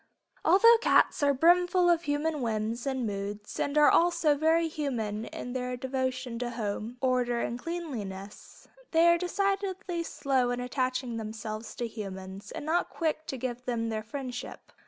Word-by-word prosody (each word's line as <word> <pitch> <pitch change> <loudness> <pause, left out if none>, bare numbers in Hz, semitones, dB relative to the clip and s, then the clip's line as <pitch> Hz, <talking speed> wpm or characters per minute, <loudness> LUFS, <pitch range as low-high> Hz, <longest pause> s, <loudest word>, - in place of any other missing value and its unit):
Although 460 +7 +7
cats - - +4
are 285 0 +4
brimful 350 +5 +4
of 340 -1 +4
human 295 +1 0
whims 225 +1 -2
and 260 -3 -1
moods 205 0 -5
and 285 +1 0
are 300 -1 +7
also 335 -3 +4
very 320 +3 +2
human 235 -9 -3
in 245 - -6
their 250 -1 -3
devotion 255 -2 -2
to 245 -1 -2
home, 225 +1 -4
order 250 -2 +1
and 235 +1 -2
cleanliness, 225 - -7 0.3
they 325 +1 +5
are 340 0 +5
decidedly 380 -1 -1
slow 265 -6 0
in 245 0 -1
attaching 255 -1 -2
themselves 220 0 -6
to 240 - -3
humans 195 -2 -7
and - - -6
not 335 +3 +1
quick 315 -2 -2
to 265 - -4
give 250 0 -4
them 230 -2 -1
their 220 -1 -2
friendship. 250 +2 -7
255 Hz, 155 wpm, -29 LUFS, 230-320 Hz, 0.3 s, Although